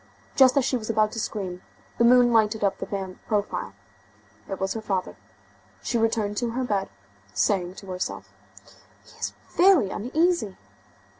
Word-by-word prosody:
Just 265 Hz, 0 st, +6 dB
as 270 Hz, -, +3 dB
she 265 Hz, -, +1 dB
was 215 Hz, -2 st, -7 dB
about 215 Hz, -1 st, +2 dB
to 225 Hz, -, -5 dB
scream, 185 Hz, -5 st, -4 dB, 0.4 s
the -, -, +5 dB
moon 245 Hz, 0 st, +6 dB
lighted 220 Hz, -1 st, +2 dB
up 200 Hz, -, +1 dB
the -, -, -5 dB
man's 190 Hz, -2 st, -4 dB
profile. 205 Hz, -, -2 dB, 0.7 s
It 195 Hz, -, -4 dB
was 190 Hz, 0 st, -1 dB
her 225 Hz, -, -4 dB
father. 195 Hz, -4 st, -2 dB, 0.7 s
She 235 Hz, -, 0 dB
returned 220 Hz, -2 st, 0 dB
to 240 Hz, +1 st, 0 dB
her 260 Hz, +2 st, -1 dB
bed, 200 Hz, -5 st, -1 dB, 0.5 s
saying 185 Hz, -3 st, +1 dB
to 195 Hz, -, -11 dB
herself: 185 Hz, 0 st, -5 dB, 0.7 s
"He -, -, -19 dB
is -, -, -3 dB, 0.2 s
very 350 Hz, -, +4 dB
uneasy!" 280 Hz, -, 0 dB
215 Hz, 160 wpm, -25 LUFS, 195-240 Hz, 0.7 s, Just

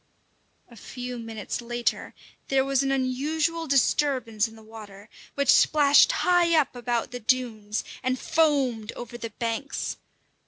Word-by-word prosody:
A -, -, -13 dB
few 245 Hz, +2 st, -7 dB
minutes 225 Hz, -1 st, -5 dB
later 240 Hz, 0 st, -3 dB, 0.3 s
there 270 Hz, -1 st, +2 dB
was 275 Hz, -1 st, +1 dB
an 270 Hz, 0 st, 0 dB
unusual 305 Hz, +6 st, -1 dB
disturbance 255 Hz, -5 st, +1 dB
in 225 Hz, -, -14 dB
the 220 Hz, -, -15 dB
water, 215 Hz, -2 st, -12 dB, 0.3 s
which 280 Hz, -2 st, +4 dB
splashed 290 Hz, -2 st, +5 dB
high 345 Hz, -2 st, +4 dB
up 280 Hz, -3 st, -1 dB
about 240 Hz, -1 st, -2 dB
the 245 Hz, -, -6 dB
dunes 220 Hz, -3 st, -1 dB, 0.2 s
and 255 Hz, 0 st, -1 dB
foamed 275 Hz, -9 st, +1 dB
over 240 Hz, 0 st, -9 dB
the 235 Hz, -1 st, -6 dB
banks. 230 Hz, +4 st, -4 dB
250 Hz, 135 wpm, -26 LUFS, 225-280 Hz, 0.3 s, splashed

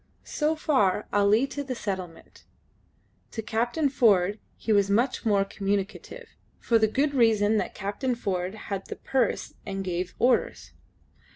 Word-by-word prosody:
So 305 Hz, +1 st, 0 dB
far 210 Hz, -11 st, +1 dB
Ali 205 Hz, +5 st, +4 dB
to 285 Hz, +1 st, -5 dB
the 265 Hz, -2 st, -4 dB
settlement. 190 Hz, -6 st, -6 dB, 0.9 s
To 225 Hz, -, -4 dB
Captain 240 Hz, +8 st, 0 dB
Ford 210 Hz, -7 st, +3 dB, 0.2 s
he 220 Hz, -, 0 dB
was 200 Hz, -1 st, +3 dB
much 235 Hz, +3 st, +1 dB
more 200 Hz, -2 st, +3 dB
communicative, 200 Hz, -, -4 dB, 0.3 s
for 230 Hz, -1 st, +2 dB
the 220 Hz, -, +4 dB
good 280 Hz, +6 st, 0 dB
reason 220 Hz, -4 st, +3 dB
that -, -, -2 dB
Captain 210 Hz, +6 st, -2 dB
Ford 190 Hz, -3 st, -3 dB
had 200 Hz, -2 st, -6 dB
the -, -, -5 dB
purse 255 Hz, -5 st, -1 dB
and 195 Hz, -1 st, -4 dB
gave 180 Hz, 0 st, -3 dB
orders. 245 Hz, 0 st, +1 dB
215 Hz, 145 wpm, -26 LUFS, 195-250 Hz, 0.9 s, Ali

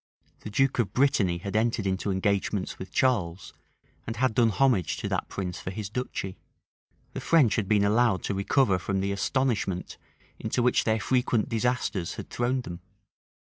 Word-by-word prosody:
The -, -, -8 dB
duke 135 Hz, +5 st, +1 dB
of 115 Hz, -, 0 dB
Brittany 115 Hz, -10 st, +2 dB
had 100 Hz, +4 st, -6 dB
entered 115 Hz, -1 st, +1 dB
into 95 Hz, +1 st, -1 dB
engagements 100 Hz, 0 st, -1 dB
with 95 Hz, -, -8 dB
Charles, 95 Hz, -9 st, 0 dB, 0.5 s
and 115 Hz, -, -3 dB
had 130 Hz, -2 st, +1 dB
done 115 Hz, +1 st, +4 dB
homage 110 Hz, -, +2 dB
to -, -, -4 dB
that -, -, -1 dB
prince 90 Hz, -2 st, -5 dB
for -, -, -5 dB
his 100 Hz, +1 st, -5 dB
duchy. 105 Hz, -5 st, -4 dB, 0.7 s
The -, -, -5 dB
French 150 Hz, -10 st, +4 dB
had 105 Hz, -4 st, -1 dB
been 105 Hz, -1 st, +3 dB
allowed 105 Hz, -2 st, +2 dB
to -, -, -1 dB
recover 100 Hz, 0 st, +2 dB
from 95 Hz, +1 st, -1 dB
the 100 Hz, +1 st, -1 dB
astonishment 100 Hz, -3 st, -1 dB, 0.4 s
into 120 Hz, -, -1 dB
which 125 Hz, -, +3 dB
their 110 Hz, 0 st, +2 dB
frequent 125 Hz, +1 st, +1 dB
disasters 115 Hz, -6 st, -1 dB
had -, -, -8 dB
thrown 125 Hz, +2 st, 0 dB
them. 85 Hz, -7 st, -8 dB
105 Hz, 170 wpm, -27 LUFS, 95-125 Hz, 0.7 s, done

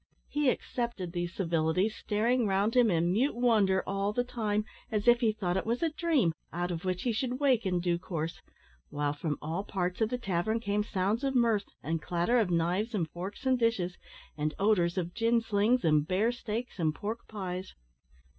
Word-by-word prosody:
He 295 Hz, -2 st, +2 dB
accepted 235 Hz, -8 st, -3 dB
these 175 Hz, -1 st, -3 dB
civilities, 170 Hz, +3 st, +1 dB
staring 230 Hz, +3 st, +1 dB
round 200 Hz, +4 st, +1 dB
him 245 Hz, -3 st, +5 dB
in 170 Hz, -1 st, +2 dB
mute 240 Hz, +9 st, +1 dB
wonder 215 Hz, -6 st, +3 dB
all 195 Hz, +1 st, -1 dB
the 245 Hz, +3 st, 0 dB
time, 215 Hz, -4 st, -1 dB, 0.3 s
as 215 Hz, +1 st, -1 dB
if 240 Hz, 0 st, +7 dB
he 230 Hz, -3 st, +3 dB
thought 190 Hz, -4 st, -1 dB
it -, -, 0 dB
was 235 Hz, +6 st, 0 dB
a 325 Hz, -, +2 dB
dream, 300 Hz, -, +2 dB, 0.2 s
out 175 Hz, +1 st, -2 dB
of 170 Hz, 0 st, -4 dB
which 185 Hz, -1 st, -2 dB
he 245 Hz, -, +1 dB
should 250 Hz, +3 st, -2 dB
wake 255 Hz, -7 st, +3 dB
in 180 Hz, -1 st, +1 dB
due 175 Hz, -1 st, 0 dB
course, 165 Hz, -2 st, -4 dB, 0.5 s
while, 145 Hz, 0 st, -1 dB
from 150 Hz, 0 st, -3 dB
all 165 Hz, +6 st, -2 dB
parts 180 Hz, -1 st, -2 dB
of 220 Hz, -, +3 dB
the 250 Hz, -, -1 dB
tavern, 200 Hz, 0 st, -1 dB
came 205 Hz, -1 st, 0 dB
sounds 205 Hz, +4 st, -1 dB
of 270 Hz, -1 st, 0 dB
mirth, 230 Hz, -4 st, +3 dB, 0.2 s
and 160 Hz, +1 st, -1 dB
clatter 175 Hz, +10 st, +1 dB
of 210 Hz, -5 st, +1 dB
knives 180 Hz, +7 st, 0 dB
and 165 Hz, -6 st, -1 dB
forks 190 Hz, +8 st, -7 dB
and 260 Hz, -1 st, +3 dB
dishes, 200 Hz, -7 st, 0 dB, 0.4 s
and 150 Hz, 0 st, -2 dB
odours 195 Hz, -4 st, +2 dB
of 175 Hz, -1 st, -2 dB
gin 230 Hz, 0 st, +2 dB
slings 225 Hz, +2 st, +2 dB
and 150 Hz, -1 st, +3 dB
bear 205 Hz, +6 st, +2 dB
steaks 235 Hz, -2 st, -5 dB
and 155 Hz, -2 st, +1 dB
pork 220 Hz, +3 st, -5 dB
pies. 185 Hz, -3 st, -5 dB
205 Hz, 195 wpm, -30 LUFS, 175-235 Hz, 0.5 s, if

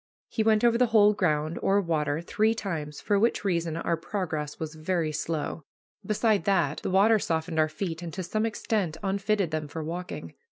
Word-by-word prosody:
He 225 Hz, -, -1 dB
went 220 Hz, 0 st, +3 dB
over 235 Hz, 0 st, +4 dB
the 250 Hz, -, +4 dB
whole 210 Hz, -2 st, +5 dB
ground, 155 Hz, -4 st, 0 dB
or 195 Hz, +1 st, +3 dB
water, 160 Hz, -4 st, 0 dB
three 215 Hz, +6 st, +1 dB
times, 155 Hz, -9 st, -4 dB
for 205 Hz, -1 st, +1 dB
which 225 Hz, -1 st, +1 dB
reason 170 Hz, -4 st, 0 dB
our 170 Hz, 0 st, 0 dB
progress 160 Hz, -4 st, -4 dB
was 160 Hz, -1 st, -4 dB
very 160 Hz, 0 st, -1 dB
slow. 155 Hz, +1 st, -3 dB, 0.4 s
Beside 210 Hz, -2 st, +1 dB
that, 170 Hz, -7 st, +2 dB
the -, -, -2 dB
water 205 Hz, +4 st, +5 dB
softened 160 Hz, -2 st, -1 dB
our 155 Hz, 0 st, +3 dB
feet, 165 Hz, 0 st, -4 dB
and 170 Hz, -1 st, -5 dB
to 190 Hz, -, -3 dB
some 215 Hz, +6 st, 0 dB
extent 205 Hz, -7 st, -1 dB
unfitted 200 Hz, -2 st, 0 dB
them 155 Hz, -1 st, -2 dB
for 160 Hz, +2 st, -5 dB
walking. 175 Hz, +3 st, -6 dB
175 Hz, 190 wpm, -27 LUFS, 160-205 Hz, 0.4 s, whole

